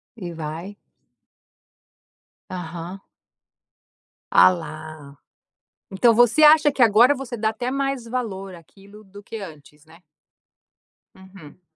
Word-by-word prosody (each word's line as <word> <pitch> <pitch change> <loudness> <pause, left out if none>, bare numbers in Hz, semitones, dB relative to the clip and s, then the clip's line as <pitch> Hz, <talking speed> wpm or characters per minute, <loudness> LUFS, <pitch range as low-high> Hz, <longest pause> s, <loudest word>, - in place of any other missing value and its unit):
E 180 -6 -8
vai. 165 +5 -7 1.7
Aham. 175 +1 -8 1.3
Ah - - +8
lá. 155 -4 -8 0.8
Então 230 +5 +3
você 245 +6 +4
acha 300 -1 +6
que 270 - -3
agora 235 +4 +5
você 260 -3 -7
dá 220 -1 -1
até 245 +3 -4
mais 275 -2 -3
valor 205 -6 -5
àquilo 200 +5 -17
do 200 +1 -14
que 225 - -11
antes, 150 -5 -12
né. 160 +1 -19 1.2
Uhum. 190 -3 -16
195 Hz, 105 wpm, -22 LUFS, 165-240 Hz, 1.7 s, Ah